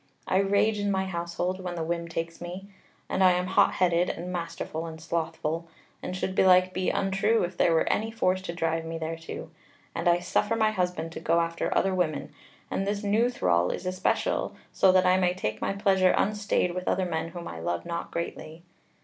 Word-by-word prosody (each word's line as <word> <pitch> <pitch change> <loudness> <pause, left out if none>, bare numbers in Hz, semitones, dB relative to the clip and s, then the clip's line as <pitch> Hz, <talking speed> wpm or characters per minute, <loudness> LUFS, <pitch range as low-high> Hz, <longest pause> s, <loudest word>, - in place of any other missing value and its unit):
I 185 - +3
rage 200 +2 +2
in 205 0 0
my 190 -1 +1
household 175 +1 -3
when 180 -1 -4
the 165 - -2
whim 170 +1 -2
takes 165 0 -5
me, 180 +3 -7 0.4
and 190 - +1
I 185 -1 +7
am 180 0 0
hot 185 - +3
headed, 175 -1 +2
and 180 +2 -4
masterful, 165 -1 -4
and 160 -1 -8
slothful, 165 0 -2 0.3
and 185 - -4
should 185 - -2
belike 185 -1 +5
be 185 0 0
untrue 195 +3 +1
if 175 +1 -3
there 170 - +3
were 165 - +2
any 220 +1 +1
force 185 -5 0
to 170 -2 -6
drive 165 -1 0
me 165 0 -5
thereto. 165 0 -6 0.4
And - - -2
I 175 0 +5
suffer 175 +5 0
my 220 -1 +3
husband 180 -5 -2
to - - -6
go 170 - +2
after 165 0 -1
other 195 - +2
women, 175 -5 -1 0.4
and 195 - -1
this 205 +1 -1
new 215 +4 +3
thrall 90 - +1
is - - -4
especial, 185 - 0 0.2
so 190 - +5
that 185 0 +4
I 185 0 +5
may 180 -1 +2
take 110 -11 -3
my - - 0
pleasure 195 -2 +3
unstayed 205 -3 +1
with 180 0 -5
other 185 - +1
men 160 -2 -2
whom 170 +1 -7
I 80 - -7
love 85 +1 -2
not 170 0 -4
greatly. 170 -1 -5
180 Hz, 205 wpm, -27 LUFS, 165-190 Hz, 0.4 s, I